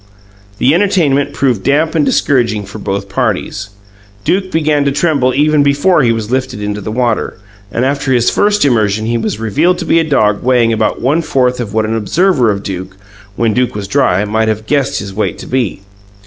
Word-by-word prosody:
The 130 +7 +3
entertainment 165 -7 +1
proved 125 -7 0
damp 150 +7 +1
and 160 -3 +2
discouraging 115 -8 +1
for 100 +2 -9
both 100 0 -3
parties. 100 +1 -2 0.5
Duke 190 - 0
began 155 -2 +1
to 140 - +2
tremble 140 -3 +1
even 150 +1 +3
before 145 +5 +3
he 120 -3 +3
was 115 -1 -3
lifted 130 -4 -2
into 105 0 -4
the 110 - -5
water, 120 -4 -1 0.3
and 120 +4 0
after 140 0 -1
his 120 -2 +2
first 205 -4 +2
immersion 110 -5 +1
he 115 +1 0
was 110 -1 -3
revealed 150 - +1
to 175 - -5
be 165 - +3
a - - +2
dog 110 -9 +1
weighing 120 -2 +2
about 110 0 -1
one 145 +7 +1
fourth 125 -5 0
of 110 -4 -5
what 110 -1 +1
an 110 +1 -2
observer 130 - +1
of 100 -1 -2
Duke, 95 0 -6 0.4
when 115 -1 +1
Duke 125 -1 0
was 100 -2 -5
dry, 105 -6 +1
must 110 +1 0
have 110 0 -2
guessed 140 +1 0
his 100 -1 -6
weight 105 +2 -2
to - - -9
be. 120 -7 -2
125 Hz, 200 wpm, -13 LUFS, 110-145 Hz, 0.5 s, The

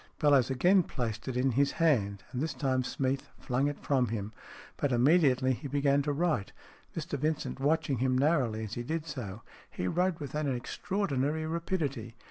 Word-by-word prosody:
Bellowes 140 -4 +4
again 175 +9 +4
placed 120 -9 -4
it 130 -1 -2
in 130 +1 +2
his 140 +3 +2
hand, 100 - +1
and 125 - -3
this 155 -1 -2
time 130 -1 0
Smeath 135 +1 -2
flung 130 +2 0
it 145 - -3
from 130 -3 +2
him. 105 -1 -4 0.4
But 145 - 0
immediately 130 0 +4
he 140 +4 -6
began 140 0 +2
to 145 +1 -1
write, 150 - 0 0.4
Mr 155 -3 -3
Vincent 155 -1 -1
watching 145 -2 +1
him 130 0 +2
narrowly 130 -7 +2
as 110 -1 -6
he 120 - -3
did 155 +5 -3
so. 115 -9 -6 0.3
He 90 - -3
wrote 180 - +1
with 145 -3 -6
an 150 -2 0
extra 125 +9 -5
ordinary 155 -4 0
rapidity. 155 - -2
140 Hz, 180 wpm, -30 LUFS, 125-155 Hz, 0.4 s, Bellowes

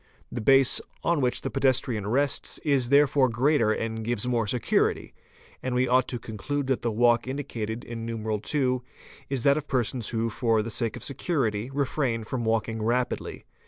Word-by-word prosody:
The - - -4
base 135 +3 +4 0.2
on 170 -4 +2
which 125 -1 0
the - - -4
pedestrian 130 -6 +1
rests 140 +6 0
is 135 -5 +2
therefore 140 -1 +4
greater 120 -1 +2
and 110 0 -2
gives 120 -1 -1
more 120 -3 0
socu 120 +2 +1
rity - - -1 0.5
and 125 -1 -2
we 125 +1 +2
ought 130 +1 +3
to 125 - -2
conclude 120 +6 -4
that 130 -1 0
the 120 - 0
walk 120 +2 +3
indicated 120 -5 -4
in 115 -1 -6
IT. 110 +2 -3 0.7
is 135 -3 -2
that 140 +1 +4
of 150 -1 -4
persons 125 -2 -1
who 115 0 -1
for 115 -2 +1
the 115 - -5
sake 115 0 -1
of - - -8
security 130 -6 -1
refrain 135 -4 -1
from 120 +1 -3
walking 110 0 0
rapidly. 120 +3 -2
120 Hz, 175 wpm, -26 LUFS, 115-135 Hz, 0.7 s, base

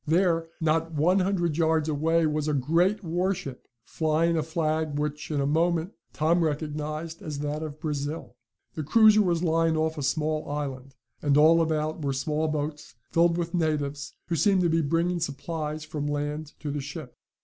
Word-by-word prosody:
There, 165 0 +2
not 165 0 0
one 170 +6 +3
hundred 180 -5 0
yards 160 -1 +2
away, 160 +2 +2
was 155 0 -1
a 150 - +1
great 170 +10 +2
warship, 175 -5 -2 0.2
flying 160 +4 +1
a 160 - +1
flag 155 -2 -1
which, 150 0 -3
in 150 -2 -1
a 140 - +1
moment, 165 +4 +1 0.2
Tom 165 +2 +2
recognized 155 +1 -3
as 150 -2 -5
that 150 +1 -3
of 155 -1 -6
Brazil. 150 -4 -4 0.4
The 155 - -4
cruiser 215 +7 +6
was 175 -3 +1
lying 165 -1 +2
off 160 0 -1
a - - -3
small 155 +2 -1
island, 135 -2 -5 0.3
and 145 -1 +3
all 160 +2 +6
about 155 0 -1
were 140 -1 0
small 150 +3 -1
boats, 150 -4 -4 0.2
filled 170 0 +3
with 170 -1 -3
natives, 145 -4 -1
who 170 - -2
seemed 195 +3 +3
to 175 - +2
be 165 0 +2
bringing 170 +4 0
supplies 155 0 -4
from 150 -1 -4
land 145 +1 -3
to 150 - -3
the 145 0 -3
ship. 145 -1 -8
155 Hz, 175 wpm, -27 LUFS, 150-165 Hz, 0.4 s, cruiser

